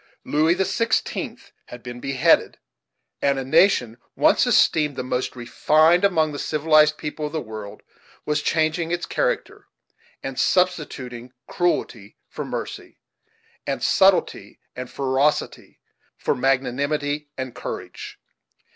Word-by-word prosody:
Louis 160 +3 +2
the 190 - 0
Sixteenth 230 +2 -2 0.2
had 120 0 -11
been 120 -1 -8
beheaded, 135 +5 +2 0.6
and 140 -1 +2
a 135 - -3
nation 125 - +3 0.2
once - - +3
esteemed 150 -3 +3
the - - -4
most 125 0 -3
refined 155 +8 +3
among 160 -6 +2
the 145 - -6
civilized 155 0 +3
people 150 0 -4
of 150 - -11
the 160 - -1
world 110 -5 -9 0.4
was 150 0 0
changing 160 +2 0
its 175 0 -2
character, - - -2 0.6
and - - -5
substituting 130 -9 -1
cruelty 120 - -2
for - - -6
mercy, - - -7 0.7
and - - -2
subtlety - - +2 0.2
and 125 0 -6
ferocity 140 +2 -1 0.4
for - - 0
magnanimity 140 +3 -1
and 130 -2 -5
courage. 125 - -7
145 Hz, 120 wpm, -23 LUFS, 125-160 Hz, 0.7 s, nation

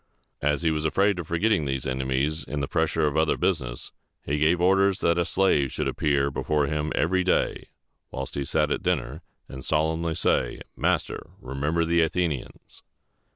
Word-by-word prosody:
As 75 +3 +1
he 80 - +3
was 75 -1 -1
afraid 95 +4 +2
of 85 - -5
forgetting 90 0 +1
these 65 -2 -2
enemies 65 +4 -1
in 75 - -4
the 70 - -2
pressure - - +1
of 75 0 0
other 80 0 +2
business, - - -2 0.3
he 75 +2 -1
gave 80 +3 +3
orders 95 +2 +3
that 85 +1 +2
a 85 - +1
slave 80 -9 +2
should - - -2
appear 70 -2 +1
before 75 +2 0
him 75 +1 -2
every 95 +3 +2
day 90 - 0 0.4
while 65 0 -5
he 70 - -2
sat 75 +1 0
at - - 0
dinner, 70 +7 -1 0.3
and 65 0 -9
solemnly 80 +1 0
say, - - 0
"Master, - - -1
remember 75 0 -1
the 85 +1 +3
Athenians!" 80 -4 -3
80 Hz, 170 wpm, -25 LUFS, 70-85 Hz, 0.4 s, he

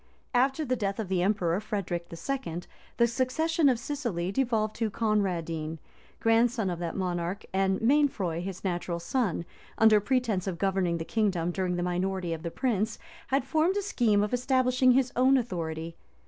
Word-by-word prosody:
After 265 +5 +2
the 255 -1 0
death 200 -4 -2
of 210 -4 -3
the 185 -2 +1
emperor 185 -2 +1
Frederic 190 -5 -3
II., 175 0 -4 0.4
the 235 - +5
succession 275 +6 +1
of 250 - +2
Sicily 235 -9 -3
devolved 220 -2 0
to 225 -1 0
Conradine, 170 -8 -1 0.4
grandson 225 -2 +2
of 170 - -4
that 170 -2 -3
monarch; 180 0 -2
and 190 0 +1
Mainfroy, 225 - +2
his 185 0 -6
natural 175 -2 -2
son, 180 -2 -1 0.3
under 220 -1 +6
pretence 220 -5 0
of 180 -3 -2
governing 185 -2 +1
the 165 - -4
kingdom 185 -6 0
during 180 0 -1
the 175 - -1
minority 180 0 -1
of 160 - -5
the 170 - -3
prince, 220 0 -1 0.3
had 270 -1 +1
formed 320 +7 +2
a 405 - -1
scheme 225 - +2
of 210 - -2
establishing 255 0 +3
his 260 -1 +2
own 260 +2 +5
authority. 165 -8 -3
205 Hz, 165 wpm, -28 LUFS, 175-250 Hz, 0.4 s, under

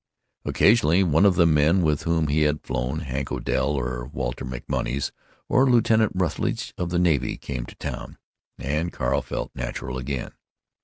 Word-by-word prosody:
Occasionally 100 -5 +4
one 85 +3 +4
of 95 - +3
the 85 - +5
men 80 +3 +4
with 75 -2 +1
whom 85 -1 +2
he 75 +1 +1
had 75 0 +1
flown—Hank 65 +2 -3
Odell - - 0
or - - -2
Walter 60 -2 -3
MacMonnies 65 +1 -3 0.4
or 130 +1 +4
Lieutenant 115 -3 +4
Rutledge 90 -2 -1
of 85 - -3
the 90 - 0
navy—came 70 -7 0
to - - -12
town, - - -6 0.4
and 75 +5 -2
Carl 60 - 0
felt - - -5
natural 65 +1 -4
again. 65 0 -4
75 Hz, 150 wpm, -24 LUFS, 65-85 Hz, 0.4 s, the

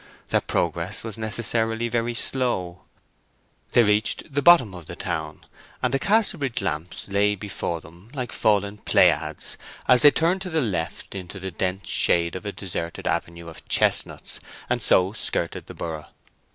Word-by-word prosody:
Their - - +2
progress 85 +4 -2
was 110 -2 -5
necessarily 115 +1 0
very 120 0 -1
slow. 95 -10 0 0.9
They 120 - +6
reached 105 +5 0
the 145 - +1
bottom 140 - +6
of 90 -3 -10
the 85 - -7
town, 80 -5 -4 0.4
and 125 0 +1
the 135 - +2
Casterbridge 185 - +1
lamps 90 -4 -3
lay 105 +1 +2
before 95 -4 -4
them 85 +7 -16
like 125 -3 -4
fallen 100 -1 +1
Pleiads - - +2 0.3
as 125 -1 +6
they 145 - +10
turned 170 +5 +1
to 190 - -3
the 160 -2 0
left 90 - -3
into 95 0 -7
the 95 0 -5
dense 95 +3 -2
shade 85 -1 +2
of 105 +3 -6
a - - -2
deserted 85 -4 -5
avenue 85 0 -2
of 80 - -12
chestnuts, - - +1 0.3
and - - +1
so 95 +2 +3
skirted - - -2
the - - -9
borough. 80 -2 -5
100 Hz, 160 wpm, -24 LUFS, 85-120 Hz, 0.9 s, they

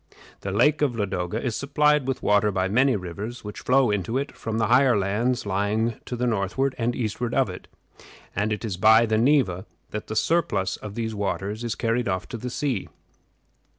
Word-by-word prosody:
The 100 - -5
Lake 145 +10 +3
of 140 -5 +1
Ladoga 95 -1 -2
is 120 -2 -2
supplied 150 0 +2
with 135 - -2
water 105 0 +3
by 95 -1 0
many 125 +6 +3
rivers, 100 +6 -6
which 105 0 -7
flow 130 -3 +3
into 105 +4 -1
it 140 +2 -2
from 110 -1 -4
the 110 - +2
higher 125 0 +4
lands 105 +6 0
lying 105 +3 0
to 125 - -4
the 125 +1 -1
northward 120 +5 0
and 120 +1 0
eastward 115 +1 -2
of - - +2
it; - - -10 0.7
and 105 +3 0
it 105 +2 -2
is 100 -5 -3
by 110 +4 +6
the 110 -1 +1
Neva 115 -9 +2 0.2
that 105 - -5
the 110 - -5
surplus 105 - +1
of 105 -1 -8
these 115 -1 -3
waters 105 +1 -3
is 120 -2 -2
carried 115 0 0
off 95 -2 -2
to - - -5
the 125 +3 -5
sea. 125 -5 -2
110 Hz, 195 wpm, -25 LUFS, 100-125 Hz, 0.7 s, by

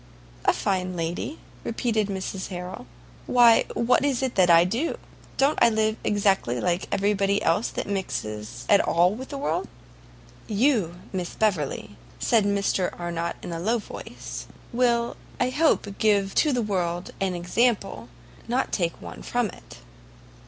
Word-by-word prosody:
"A - - +5
fine 185 -2 -1
lady?" 170 - -3 0.3
repeated 225 -2 0
Mrs 190 -1 -4
Harrel; 180 -8 -7 0.4
"why, 240 -2 +6
what 250 +3 +3
is 270 -3 +1
it 255 -6 -1
I 170 0 +8
do? 230 - -1 0.4
Don't 275 +3 +3
I 235 - +7
live 220 -1 +1
exactly 195 - +1
like 180 +1 0
every 200 +1 +2
body 200 0 +1
else 165 +8 +2
that - - -4
mixes 110 - -4
at 205 -2 +6
all 175 +3 +3
with 260 +4 -7
the 280 - -5
world?" 275 - -1 0.8
"You, 215 - +2 0.2
Miss 180 -2 -3
Beverley," 155 - -1 0.2
said 225 -4 +3
Mr 200 -2 +1
Arnott 170 -1 -2
in - - -5
a 165 - -4
low 220 +7 +1
voice, 215 - -8 0.3
"will 235 -1 +1 0.2
I 250 0 +1
hope 310 -5 +2
give 200 -2 +3
to 305 - +3
the 245 -3 +1
world 175 -4 -2
an 190 -2 0
example, 195 - 0 0.4
not 250 +3 0
take 170 -3 -1
one 85 -8 -8
from - - 0
it." - - -14
200 Hz, 150 wpm, -25 LUFS, 175-235 Hz, 0.8 s, I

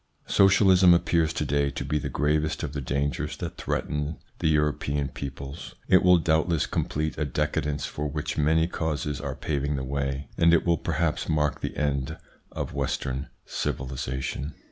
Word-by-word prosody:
Socialism 95 -2 +6
appears 85 -2 +2
to 75 - -1
day 70 0 +1
to 70 0 -5
be 75 +2 0
the - - -4
gravest 75 +2 0
of 75 -3 -4
the 70 - -3
dangers 70 +3 -2
that - - -5
threaten 75 +1 -2 0.2
the - - +1
European 75 -2 +1
peoples. 70 +3 -7
It 95 - +6
will 90 -1 +6
doubtless 80 -1 +2
complete 75 +1 -2
a 75 - +1
decadence 75 +1 -1
for 75 0 -3
which 75 +1 -3
many 80 +2 +3
causes 75 -3 -2
are 70 -2 -4
paving 70 -1 -1
the 65 - -3
way, 70 0 -2
and 85 0 +6
it - - +1
will 85 -3 +2
perhaps 85 -3 -1
mark 75 -3 +1
the - - -4
end 70 +1 -1 0.3
of - - -4
Western 65 0 -2 0.2
civilisation. 65 +2 -3
75 Hz, 165 wpm, -26 LUFS, 70-80 Hz, 0.3 s, Socialism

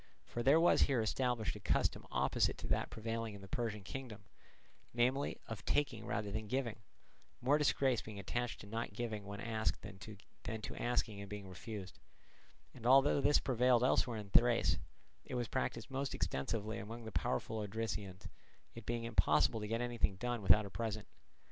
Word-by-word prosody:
For 120 - -4
there 140 +6 +6
was 170 - +5
here 135 -3 +4
established 115 0 0
a - - -7
custom - - +1
opposite - - +2
to - - -6
that - - +1
prevailing 115 -1 -3
in 100 - -10
the 95 - -10
Persian 105 -1 -2
kingdom, 115 -1 -7 0.7
namely, 130 +4 +1
of 110 -2 -6
taking 130 -7 0
rather 105 -2 -2
than 110 +1 -3
giving; 120 -2 -2 0.6
more 140 +4 +3
disgrace 135 -4 +3
being 110 -2 -9
attached 120 +5 -3
to - - -10
not 115 0 -4
giving 110 -2 -3
when 100 0 -6
asked 110 0 -1
than 100 -2 -9
to 105 +1 -7
asking 115 -4 0
and 100 - -8
being 105 -1 -6
refused; 95 +1 -7 0.7
and 120 -2 -5
although 135 +2 +6
this 145 - +5
prevailed 125 -1 +3
elsewhere 125 -2 +2
in 105 -2 -7
Thrace, 115 -10 +4 0.4
it - - -6
was 120 -2 -1
practised 115 +2 -2
most 135 +1 -2
extensively 110 +10 -2
among 115 +2 -7
the 110 - -6
powerful 105 - -1
Odrysians, 105 -3 -4 0.5
it 115 -2 -10
being 120 0 -1
impossible 105 -3 +3
to 105 - -4
get 115 +2 -1
anything 120 -5 0
done 120 +3 -2
without 100 +2 +6
a 100 - -8
present. 110 -1 -3
115 Hz, 175 wpm, -36 LUFS, 105-120 Hz, 0.7 s, there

